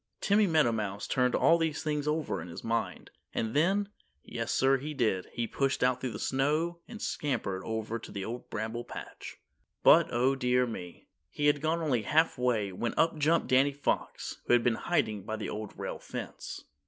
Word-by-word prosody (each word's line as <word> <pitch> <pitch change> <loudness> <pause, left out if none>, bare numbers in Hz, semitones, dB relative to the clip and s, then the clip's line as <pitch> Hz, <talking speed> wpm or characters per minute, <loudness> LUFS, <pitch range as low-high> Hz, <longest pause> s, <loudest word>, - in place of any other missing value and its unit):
Timmy 205 0 +3
Meadowmouse 115 - +1
turned 125 -1 +2
all 170 0 +5
these 160 -2 -1
things 150 -1 -1
over 150 - -1
in 85 - -8
his 85 - -8
mind, 115 0 -2 0.2
and 110 +2 -1
then 195 +6 +2 0.3
yes, 115 -1 -4
sir, 135 +1 +4
he 150 +3 -5
did 110 -8 0
he 120 - -2
pushed 135 +3 0
out 125 0 +2
through 130 - -1
the - - -4
snow 155 +6 0
and 225 -2 -9
scampered 115 - -2
over 110 0 -3
to - - -10
the 100 -1 -4
Old 120 +2 -6
Bramble 110 +2 -3
Patch. - - -9 0.5
But, - - +7
oh 125 +3 +3
dear 125 -1 +2
me. 90 -7 -8 0.2
He 145 - -2
had 145 -1 +4
gone 165 +2 0
only 130 -7 +1
half 160 +9 +2
way 120 -6 0
when 115 +6 -3
up 165 -1 +2
jumped 160 +3 +2
Danny 135 +2 +4
Fox, 145 - -2
who - - +4
had 120 -1 +5
been 120 - +3
hiding 110 -2 0
by 110 +3 -4
the 110 - -4
Old 105 -1 -6
Rail - - -4
Fence. - - -7
125 Hz, 190 wpm, -30 LUFS, 110-150 Hz, 0.5 s, But